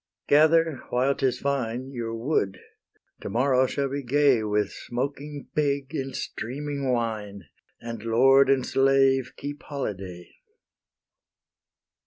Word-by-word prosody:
Gather, 160 +1 +4
while 130 +3 +2
'tis 135 -3 0
fine, 130 -2 -2
Your 115 -3 -4
wood; 115 -5 -1 0.6
to - - -5
morrow 130 +1 +2
shall 140 +1 -1
be 140 +1 -3
gay 135 -1 +3
With 105 -1 0
smoking 140 +3 -5
pig 140 -1 -1
and 135 -3 -4
streaming 140 +2 -4
wine, 110 -5 -3 0.4
And 115 -2 -7
lord 135 +4 +5
and 135 -2 +3
slave 135 -1 +3
keep 145 +1 -6
holyday. 95 -10 -6
135 Hz, 115 wpm, -26 LUFS, 115-140 Hz, 0.6 s, lord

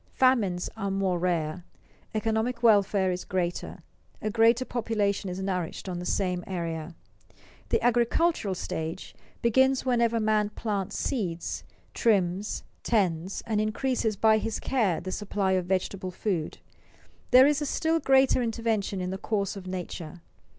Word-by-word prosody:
Famines 215 -9 +2
are 200 -3 -3
more 195 -2 0
rare, 170 -1 -1 0.5
economic 225 +2 -1
welfare 200 -4 +4
is 180 0 -3
greater, 175 -1 -3 0.4
a 215 - -2
greater 230 +3 +4
population 215 -5 -1
is 180 +1 -5
nourished 185 -2 -3
on 180 -2 -3
the 180 - -5
same 180 -2 0
area. 170 -3 -4 0.7
The - - +3
agricultural 240 - +2
stage 160 -2 -5 0.3
begins 260 +3 +3
whenever 235 -2 +2
man 215 -1 +2
plants 205 -2 -3
seeds, 180 -10 -2 0.3
trims, 200 -2 +1 0.2
tends, 185 -5 0
and 215 -2 0
increases 220 0 0
by 220 +2 +4
his 225 0 -3
care 220 -10 +1
the 185 - -5
supply 200 -1 -1
of 185 -2 +1
vegetable 190 0 -1
food. 180 -3 -2 0.7
This 265 +3 +7
is - - -3
a - - 0
still 325 +1 +1
greater 265 -3 +4
intervention 225 -4 -1
in 180 0 -3
the 190 - -4
course 200 -2 -1
of 190 -2 -8
nature. 175 -2 -6
200 Hz, 140 wpm, -27 LUFS, 180-230 Hz, 0.7 s, This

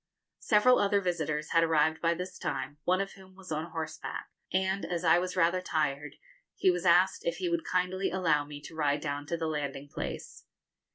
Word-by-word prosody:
Several 235 +4 +4
other 200 0 +3
visitors 165 -5 -2
had 165 - +5
arrived 160 -1 +2
by 170 0 +2
this 180 +2 -6
time, 145 +2 -4
one 185 +2 +3
of 195 - -4
whom 190 -1 -16
was 185 -3 -12
on 155 +2 -2
horseback, 160 -1 -5 0.2
and, 190 +1 0
as 175 -1 -3
I 165 0 +5
was 180 0 -3
rather 180 0 +3
tired, 150 -4 -1 0.4
he 185 - +4
was 180 0 -1
asked 185 - +4
if - - -1
he 360 - -2
would 340 -1 0
kindly 185 -2 0
allow 165 -5 +2
me 145 0 -9
to - - -10
ride 145 -2 +1
down 145 -1 -3
to 170 - -1
the 165 - -2
landing 145 -3 -3
place. - - -6
170 Hz, 195 wpm, -30 LUFS, 155-185 Hz, 0.4 s, had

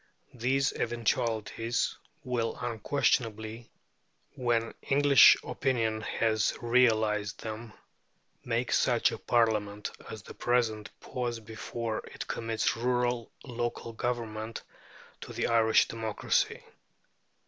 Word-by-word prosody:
These 130 +3 +1
eventualities 115 0 -1 0.3
will 120 -3 -1
unquestionably, 115 -1 -1 0.6
when 120 -2 0
English 140 0 +7
opinion 115 -5 0
has 110 0 0
realized 110 -4 +2
them, 110 0 -6 0.7
make - - -1
such - - +3
a - - -6
Parliament 105 -3 +1 0.2
as 110 -3 -8
the - - -10
present 115 -3 0
pause 120 -2 -3
before 115 0 -4
it - - -7
commits 115 -1 -1
rural 120 0 0
local 120 -2 -4
government 115 -2 -3 0.6
to - - -9
the - - -1
Irish 115 -1 +4
democracy. 110 -2 -1
115 Hz, 95 wpm, -30 LUFS, 110-120 Hz, 0.7 s, English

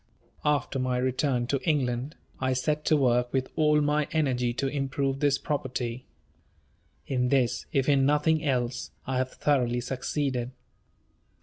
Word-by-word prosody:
After 145 -2 0
my 130 -1 0
return 130 0 0
to 135 +2 -1
England, 135 -2 -1 0.2
I 130 0 +1
set 150 +4 -1
to 155 - +4
work 125 -2 +2
with 130 -1 -1
all 150 -1 +3
my 150 0 +1
energy 130 -6 +1
to 135 +3 -1
improve 135 0 -1
this 145 -1 +3
property. 130 -4 -3 1.0
In 125 -2 0
this, 130 -3 +1
if 135 -1 +1
in 140 -2 +4
nothing 150 +3 +2
else, 125 -4 -1 0.2
I 130 -1 -1
have 130 0 -2
thoroughly 125 -4 +1
succeeded. 130 0 -2
135 Hz, 140 wpm, -27 LUFS, 125-145 Hz, 1.0 s, to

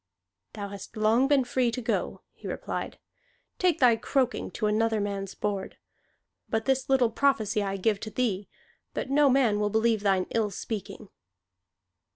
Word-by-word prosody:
"Thou 200 -1 -5
hast 200 +2 -9
long 225 +5 +3
been 280 -2 +4
free 250 0 +1
to 235 - -3
go," 235 -1 -2
he - - -10
replied. - - -4 0.6
"Take 360 -3 +3
thy 245 -3 +6
croaking 255 +2 0
to 215 - -3
another 220 +1 +2
man's 200 -1 -3
board! 200 -2 -3 0.7
But 220 0 -1
this 265 -1 0
little 255 -4 +3
prophecy 220 -6 +1
I 195 -1 -2
give 205 +1 +1
to 215 - -6
thee, 210 -5 -1 0.5
that - - -3
no 290 0 +5
man 250 -6 +3
will 210 0 +1
believe 220 0 +2
thine 195 -2 +2
ill 220 -2 +1
speaking." 210 +1 -6
220 Hz, 160 wpm, -27 LUFS, 205-255 Hz, 0.7 s, thy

